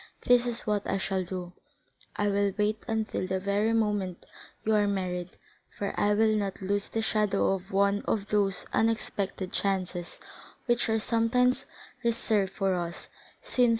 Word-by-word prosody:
This 245 0 +4
is 235 -1 0
what 210 -2 +1
I 195 - +1
shall 190 -1 -1
do; 180 -1 -6 0.6
I 205 - +1
will 200 0 +2
wait 210 +1 +1
until 220 -4 -1
the 190 0 0
very 200 +3 +1
moment 205 -5 0 0.4
you 220 - +2
are 210 -1 +4
married, 180 -2 -2 0.3
for 200 - -4
I 205 0 +2
will 220 0 +4
not 200 -2 -2
lose 200 +1 -1
the 225 - -1
shadow 210 -3 +2
of 190 0 -5
one 200 +1 +3
of 205 -2 -1
those 200 -3 +1
unexpected 205 -3 -1
chances 185 -3 -1 0.5
which 240 -2 +2
are 220 - +3
sometimes 235 +3 +2 0.4
reserved 225 -4 +1
for 195 -1 +1
us, 170 -1 -4 0.3
since - - -6
M. - - +4
205 Hz, 160 wpm, -29 LUFS, 190-220 Hz, 0.6 s, This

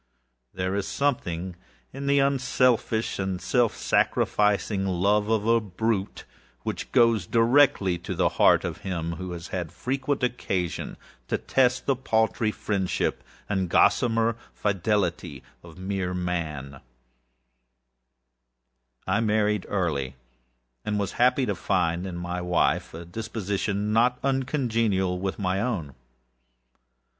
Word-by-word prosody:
There 95 0 -2
is 100 -1 -1
something 95 -11 -1 0.4
in 140 +1 -5
the 140 0 +4
unselfish 130 -5 +1
and 95 -1 -2
self 120 +1 +1
sacrificing 105 -1 +1
love 100 +3 +1
of 110 -2 +1
a 115 0 +4
brute, 105 0 -2 0.4
which - - -4
goes 115 -7 +3
directly 115 -7 +3
to - - -5
the - - +2
heart - - +4
of - - -4
him 85 -3 -3
who 95 -1 -6
has 85 0 -8
had 90 -4 -4
frequent 135 +1 -2
occasion 95 -8 -2 0.3
to - - 0
test 130 -1 +1
the 135 - +2
paltry 110 -3 +1
friendship 100 -3 -1 0.2
and 95 -3 -1
gossamer 115 +4 +3 0.2
fidelity 95 - -1 0.2
of 85 -1 -14
mere 95 -1 -3
Man. 80 -7 -4 2.2
I - - +1
married 105 -1 +1
early, 70 -9 -1 0.7
and 105 -1 -1
was 100 -2 -1
happy 125 +2 +3
to 105 - 0
find 85 0 0
in 90 - -6
my 90 +1 -4
wife 90 0 +1
a 85 +1 -8
disposition 105 +1 -2
not 120 +2 +3
uncongenial 115 -9 0
with 95 0 -3
my 95 -1 0
own. 90 - -2
100 Hz, 120 wpm, -26 LUFS, 90-115 Hz, 2.2 s, the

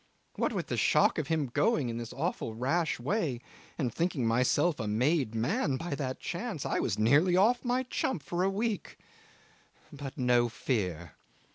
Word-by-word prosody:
What - - 0
with - - -2
the - - -3
shock - - +3
of 150 - -3
him 160 -2 +1
going 220 - +2
in 115 - -4
this 115 -1 -6
awful 140 -7 -3
rash 155 +8 0
way, 145 - -1 0.4
and 125 -7 -1
thinking 165 -6 0
myself 125 +8 +2
a 110 - -2
made 125 +2 +1
man 145 - 0
by 165 0 -4
that 130 -2 -3
chance, 175 - -4
I - - 0
was - - -1
nearly 145 +11 +4
off 235 +6 +3
my 250 +1 +1
chump 250 - -2
for 175 0 -2
a 190 - +3
week. 210 +1 -2 1.0
But 140 -2 -7
no 120 -1 +3
fear. 90 - -2
145 Hz, 170 wpm, -30 LUFS, 120-180 Hz, 1.0 s, nearly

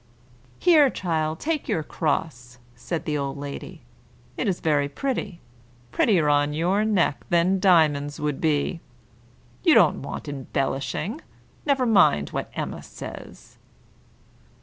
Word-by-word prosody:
"Here, 310 -6 +5
child, 160 -6 -2
take 315 -2 -2
your 160 - 0
cross," 135 -6 -3 0.2
said 160 +8 -5
the 150 -2 -1
old 140 0 -3
lady. 145 +4 -8 0.5
"It 240 - -2
is 185 -3 0
very 145 -3 +1
pretty; 210 - -4 0.5
prettier 175 -9 +2
on 145 0 +2
your 185 +6 +1
neck 190 - +1
than 175 +3 +2
diamonds 155 -6 +3
would 150 -2 -2
be. 155 +1 0 0.8
You 330 - +5
don't 180 -9 +4
want 140 - -7
embellishing; 140 - -3 0.5
never 275 -3 +2
mind 190 - +4
what - - -4
Emma - - -4
says." - - -11
160 Hz, 125 wpm, -24 LUFS, 145-195 Hz, 0.8 s, Here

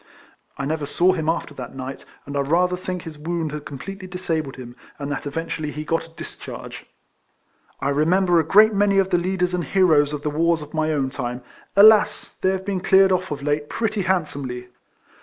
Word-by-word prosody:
I 140 - -3
never 150 0 -2
saw 180 +5 +3
him 160 -3 -1
after 165 -3 -2
that 130 -1 -8
niglit; 130 +1 -7 0.2
and 140 - -7
I - - +1
rather 175 +6 +2
think 180 -1 -5
his 160 -3 -9
wound 165 0 -2
had 150 -1 -6
completely 185 +8 -7
disabled 165 -6 -3
him, 120 -2 -10 0.2
and 145 -1 -5
that 145 - -4
eventually 155 +1 -3
he 150 +1 -5
got 165 +1 -1
a 165 - -22
discharge. - - -9 0.9
I 140 - -1
remember 170 +5 +3
a - - +2
great 215 +4 +6
many 200 -1 +3
of 195 0 +2
the 175 - +3
leaders 180 0 -1
and 180 -1 0
heroes 155 -3 +3
of 150 -1 -5
the 150 - -1
wars 165 +1 +1
of 150 - -13
my 155 0 0
own 135 -3 0
time. 125 -2 -4 0.3
Alas! 215 +2 +5
they 185 - +3
have 190 0 -2
been 200 -2 -1
cleared 190 0 +5
off 185 0 0
of 145 -2 -5
late 145 0 -1
])retty 220 -2 0
handsomely 140 -9 -2
165 Hz, 200 wpm, -22 LUFS, 145-185 Hz, 0.9 s, great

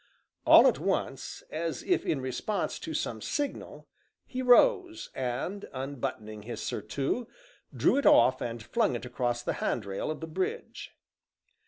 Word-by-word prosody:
All - - +9
at - - +4
once, - - -2
as 165 +1 -3
if 365 - +1
in 140 - 0
response 175 +10 -2
to - - -6
some 110 -5 -2
signal, 290 - -4 0.4
he 255 -1 -4
rose, 340 - +4
and 130 +11 -3
unbuttoning 125 -5 -5
his 115 +1 -6
surtout, 135 - -2 0.4
drew - - +2
it 285 - +3
off 210 - +6
and 115 -1 -4
flung 120 - +1
it 120 - -5
across 120 -1 -2
the - - -1
handrail 100 0 -2
of 155 - -3
the 160 - -5
bridge. 175 +4 -4
135 Hz, 145 wpm, -29 LUFS, -, 0.4 s, All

